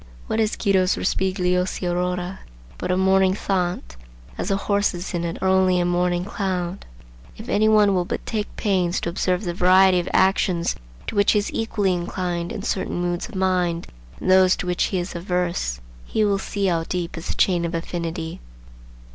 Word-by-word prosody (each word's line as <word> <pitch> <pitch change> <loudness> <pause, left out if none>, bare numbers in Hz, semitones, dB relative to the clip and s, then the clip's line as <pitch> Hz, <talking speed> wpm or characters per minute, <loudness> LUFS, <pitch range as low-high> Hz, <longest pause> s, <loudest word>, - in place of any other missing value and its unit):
What 220 - -2
is 220 -1 +1
Guido's 190 -3 +2
Rospigliosi 180 -1 0
Aurora 180 +1 -2 0.4
but - - -3
a 180 - +2
morning 190 0 +3
thought, 180 - -2 0.4
as - - -4
the 195 -1 +1
horses 200 -3 -1
in 170 -1 -1
it 170 -1 -3
are - - +2
only 185 -1 +3
a 175 - +1
morning 175 0 +1
cloud? 190 -3 -3 0.5
If - - -9
any 215 +1 +3
one 210 -2 +5
will 180 -2 +1
but - - -4
take 215 -2 -3
pains 185 -3 +1
to - - -2
observe 180 +2 0
the 175 -3 -2
variety 185 +1 +5
of 175 - -3
actions 185 -2 +2 0.3
to - - -5
which 205 0 +4
he - - +3
is 205 - -1
equally 210 -4 0
inclined 175 -1 -3
in 200 - -5
certain 190 - -2
moods 175 +4 -2
of 230 - -11
mind, 180 -3 0 0.3
and 185 - 0
those 185 0 +6
to - - -5
which 180 0 +1
he 190 - -2
is 175 +1 -3
averse, 175 - -2 0.2
he 215 - 0
will 200 -1 +1
see 200 0 -2
how 170 -3 +1
deep 175 -1 -3
is 165 +1 -7
the - - -3
chain 175 -3 +2
of 170 0 -2
affinity. 165 -1 -4
180 Hz, 190 wpm, -23 LUFS, 175-195 Hz, 0.5 s, those